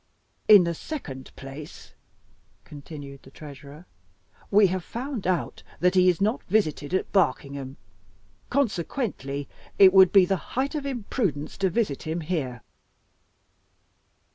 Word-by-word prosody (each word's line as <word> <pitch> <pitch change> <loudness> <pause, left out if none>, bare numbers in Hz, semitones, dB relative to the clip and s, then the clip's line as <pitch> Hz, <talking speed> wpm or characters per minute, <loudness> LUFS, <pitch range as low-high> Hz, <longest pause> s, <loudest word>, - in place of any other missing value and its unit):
"In 205 -4 +9
the 170 0 -1
second 145 - -7
place," 135 - -10 0.7
continued 145 -2 -10
the - - -16
Treasurer, 145 +2 -12 0.6
"we 205 +1 +6
have 185 -1 -1
found 245 - -5
out 185 -2 -1 0.2
that 180 +1 +3
he 185 -1 +5
is 175 - +1
not 215 +5 0
visited 160 -7 0
at - - -2
Barkingham. 140 -6 0 0.7
Consequently, 185 - -2 0.3
it 190 -2 +8
would 190 -2 +7
be 195 -2 +6
the 195 +1 0 0.2
height 270 +3 0
of 290 -2 -3
imprudence 205 - -3
to 195 -1 +2
visit 200 - -1
him 160 +2 -3
here." 150 -8 -3
180 Hz, 125 wpm, -25 LUFS, 145-205 Hz, 0.7 s, In